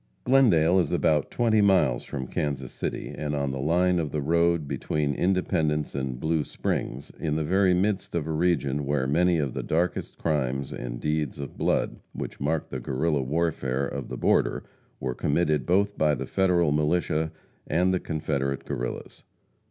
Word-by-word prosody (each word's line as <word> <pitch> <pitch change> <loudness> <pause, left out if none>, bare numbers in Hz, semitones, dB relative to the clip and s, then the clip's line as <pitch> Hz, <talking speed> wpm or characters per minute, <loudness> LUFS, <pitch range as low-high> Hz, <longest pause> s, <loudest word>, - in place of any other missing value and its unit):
Glendale 95 -10 +4
is 85 -5 0
about 75 -2 +2
twenty 115 -3 +2
miles 90 -12 +3
from 65 -2 -5
Kansas 70 -1 -3
City, - - -4
and 75 -1 -3
on 70 -1 -1
the 65 - -4
line 90 +5 +2
of 80 -3 -1
the 75 - -1
road 85 0 +2
between 75 0 -1
Independence 80 -3 0
and 65 -2 -3
Blue 80 0 +1
Springs, 70 -1 -3
in 75 -2 -1
the 80 - 0
very 95 +3 +3
midst 95 -1 0
of 80 -3 0
a 80 - -3
region 75 -4 0
where 70 -2 +1
many 85 +5 +3
of 70 -5 -1
the - - -3
darkest 85 +2 -1
crimes 70 -4 -1
and - - -5
deeds 75 -2 -1
of 70 -1 -7
blood - - 0 0.2
which - - -6
marked 75 +2 -1
the 65 - -3
Guerrilla 70 +4 0
warfare 70 -2 -1
of 70 -2 -5
the - - -5
border - - +2 0.4
were 65 -1 -2
committed 75 -1 0
both 100 +3 +2
by 75 -1 +3
the - - -4
Federal 90 -5 +2
militia 80 +1 +1 0.4
and 90 +4 +2
the 90 - +1
Confederate 70 -4 -2
Guerrillas. - - -5
75 Hz, 170 wpm, -26 LUFS, 70-85 Hz, 0.4 s, Glendale